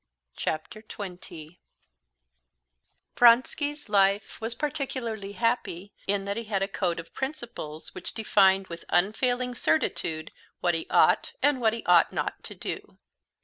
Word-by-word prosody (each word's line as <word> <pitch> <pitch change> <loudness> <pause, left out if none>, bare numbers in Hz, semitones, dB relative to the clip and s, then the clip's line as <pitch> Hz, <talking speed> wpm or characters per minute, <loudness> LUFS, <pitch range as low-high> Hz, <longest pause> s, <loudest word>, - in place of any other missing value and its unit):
Chapter 160 +7 -3
20 180 -5 -9 1.6
Vronsky's 285 +5 +4
life 200 0 +2
was 225 +1 -3
particularly 255 -9 -3
happy 205 -5 -1
in 195 0 0
that 200 +1 -2
he 230 - -4
had 200 -2 0
a - - 0
code 180 -4 -1
of 165 - -10
principles, 240 - -5
which 185 - -7
defined 195 -3 +4
with 170 -2 -9
unfailing 245 +7 +1
certitude 155 -3 0 0.3
what 175 -1 +2
he 165 - -2
ought - - +4
and 285 -3 +3
what 220 -2 +3
he 230 - -5
ought 175 -1 +5
not - - -3
to - - -7
do. - - -6
205 Hz, 135 wpm, -27 LUFS, 180-240 Hz, 1.6 s, ought